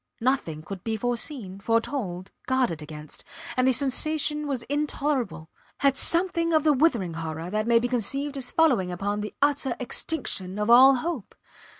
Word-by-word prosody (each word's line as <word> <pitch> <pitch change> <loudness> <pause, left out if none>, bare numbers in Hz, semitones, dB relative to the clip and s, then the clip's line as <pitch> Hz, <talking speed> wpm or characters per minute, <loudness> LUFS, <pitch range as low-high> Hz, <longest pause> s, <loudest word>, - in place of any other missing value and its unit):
Nothing 225 - -1
could 190 +1 -8
be 220 -1 -2
foreseen, 235 -4 -3
foretold 205 -4 -2 0.2
guarded 250 - +1
against. 150 0 -9 0.3
And 255 0 +2
the - - +5
sensation 300 +3 0
was 265 -4 -2
intolerable, 275 - -2 0.3
had 275 -1 +4
something 335 +1 +1
of 310 -2 +4
the 305 -1 +4
withering 250 - +2
horror 160 +1 -5
that 215 +1 -1
may 235 0 +5
be 235 +1 +1
conceived 275 +4 -1
as 265 -3 -3
following 250 - +2
upon 205 +3 -2
the 210 - -6
utter 285 -3 +1
extinction 210 - -2
of 210 +2 +1
all 265 +3 +8
hope. 285 - -4
245 Hz, 160 wpm, -26 LUFS, 195-285 Hz, 0.3 s, all